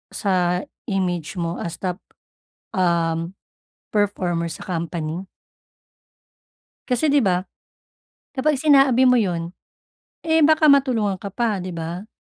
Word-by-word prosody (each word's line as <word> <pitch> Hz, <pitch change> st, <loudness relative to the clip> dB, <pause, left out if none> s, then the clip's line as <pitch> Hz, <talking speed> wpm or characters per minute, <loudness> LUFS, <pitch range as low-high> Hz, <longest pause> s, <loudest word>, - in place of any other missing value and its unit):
sa 180 Hz, -2 st, +1 dB, 0.2 s
image 180 Hz, -5 st, -2 dB
mo 170 Hz, -1 st, -3 dB
as 170 Hz, -1 st, -4 dB
top, 180 Hz, +1 st, -4 dB, 0.7 s
um, 170 Hz, 0 st, 0 dB, 0.6 s
performer 180 Hz, -5 st, 0 dB
sa -, -, -8 dB
company. 170 Hz, 0 st, -3 dB, 1.6 s
Kasi 265 Hz, +4 st, +1 dB
'di 290 Hz, -, +5 dB
ba, 185 Hz, -6 st, +1 dB, 0.9 s
kapag 285 Hz, +1 st, +1 dB
sinabi 270 Hz, -3 st, +5 dB
mo 250 Hz, -, +6 dB
yun, 175 Hz, -6 st, -1 dB, 0.7 s
eh, 320 Hz, 0 st, +3 dB
baka 310 Hz, -1 st, +6 dB
matulungan 230 Hz, -9 st, +1 dB
ka 200 Hz, -, -5 dB
pa, 210 Hz, 0 st, -1 dB
'di 180 Hz, -1 st, -6 dB
ba. 170 Hz, +5 st, -5 dB
190 Hz, 115 wpm, -22 LUFS, 175-250 Hz, 1.6 s, mo